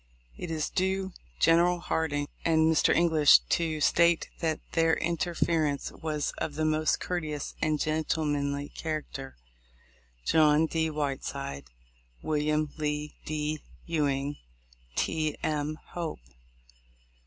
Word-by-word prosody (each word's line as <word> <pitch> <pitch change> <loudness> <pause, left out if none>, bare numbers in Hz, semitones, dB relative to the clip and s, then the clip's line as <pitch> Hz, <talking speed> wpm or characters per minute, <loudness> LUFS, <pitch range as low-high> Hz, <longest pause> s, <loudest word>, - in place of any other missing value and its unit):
It 175 - -6
is 155 -2 -2
due 190 0 0 0.3
General 175 +2 +5
Hardin 160 -4 -1 0.2
and 160 -1 +3
Mr. 160 -1 +4
English 160 -3 +6
to 160 -2 +1
state 170 +2 +4
that 160 -2 0
their 165 -1 +3
interference 165 -3 0
was 155 -2 -3
of 150 - -3
the 155 +1 0
most 155 0 +2
courteous 155 -5 -3
and 155 -1 +1
gentlemanly 145 -2 -1
character. 150 - -5 0.9
John 155 0 +5
D. 160 0 0
Whiteside. 140 - -3 0.6
Wm. 150 0 0
Lee 150 0 -2
D. 155 0 -2 0.3
Ewing. 145 -3 0 0.6
T. 155 -2 0
M. 150 0 -1
Hope. 170 -2 -4
155 Hz, 110 wpm, -29 LUFS, 150-165 Hz, 0.9 s, English